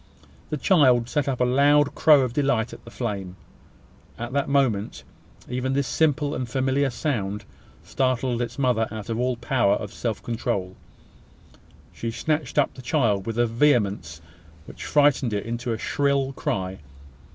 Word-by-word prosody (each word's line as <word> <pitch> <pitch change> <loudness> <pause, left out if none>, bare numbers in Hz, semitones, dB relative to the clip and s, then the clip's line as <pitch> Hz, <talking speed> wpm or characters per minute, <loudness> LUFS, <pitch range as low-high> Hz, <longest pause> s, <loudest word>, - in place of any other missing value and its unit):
The 150 - -2
child 130 - +4
set 145 0 0
up 130 -2 -1
a - - +4
loud 145 +3 +4
crow 150 -3 +5
of 125 -2 -1
delight 125 -5 0
at - - -11
the - - -10
flame. 100 -7 -4 0.8
At 120 +2 -6
that 140 0 0
moment, 125 -8 0 0.4
even 125 +2 -2
this 140 0 +1
simple 150 -2 +1
and 125 -2 -4
familiar 135 +2 +1
sound 110 -6 -3 0.4
startled 130 -2 0
its 120 0 -4
mother 125 -5 +1
out 110 +1 -7
of 115 - -2
all 125 0 0
power 115 -6 +2
of 105 0 -6
self 115 -2 -3
control. 110 -5 -3 1.2
She 115 - -4
snatched 155 +7 -2
up 145 - +3
the 130 - -11
child 115 -7 0
with 115 0 -3
a 120 - +3
vehemence 105 - +1 0.4
which - - -9
frightened 145 -5 +3
it 105 0 -2
into 120 +1 -3
a 115 - -1
shrill 140 +2 0
cry. 95 -6 -3
125 Hz, 160 wpm, -24 LUFS, 110-140 Hz, 1.2 s, crow